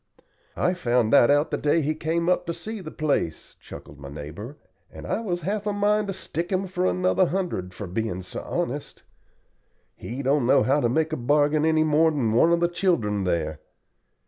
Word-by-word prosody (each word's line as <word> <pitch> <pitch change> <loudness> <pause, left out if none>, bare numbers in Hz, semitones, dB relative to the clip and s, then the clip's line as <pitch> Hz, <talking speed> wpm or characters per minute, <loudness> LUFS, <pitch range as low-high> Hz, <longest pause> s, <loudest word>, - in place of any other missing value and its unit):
"I 180 - +2
found 120 -9 +1
that 120 - +6
out 145 +2 +3
the - - -1
day 150 +2 +2
he 155 +2 0
came 165 +2 -1
up 180 -1 +1
to 170 - -2
see 220 -1 -6
the 160 - -7
place," 145 - -2
chuckled 70 0 -12
my 70 -1 -9
neighbor, 80 - -8 0.3
"and - - -10
I - - -1
was 180 -6 -3
half 205 +5 -2
a 205 - 0
mind 210 +1 +1
to 195 - -2
stick 175 -1 -4
him 190 +1 0
for 185 0 -1
another 185 0 +2
hundred 170 - -3
for 105 - -6
being 95 0 -3
so - - -7
honest. - - -4 0.9
He 130 +4 -6
don't 135 -2 +2
know - - +5
how 140 +3 +2
to 120 - +2
make 155 +5 0
a - - -1
bargain 145 +4 +2
any 160 -1 +3
more 155 +1 +4
than 135 -8 0
one 140 +9 +4
of 170 0 +2
the 175 - +4
children 115 - 0
there. 80 -3 -1
155 Hz, 200 wpm, -25 LUFS, 115-180 Hz, 0.9 s, that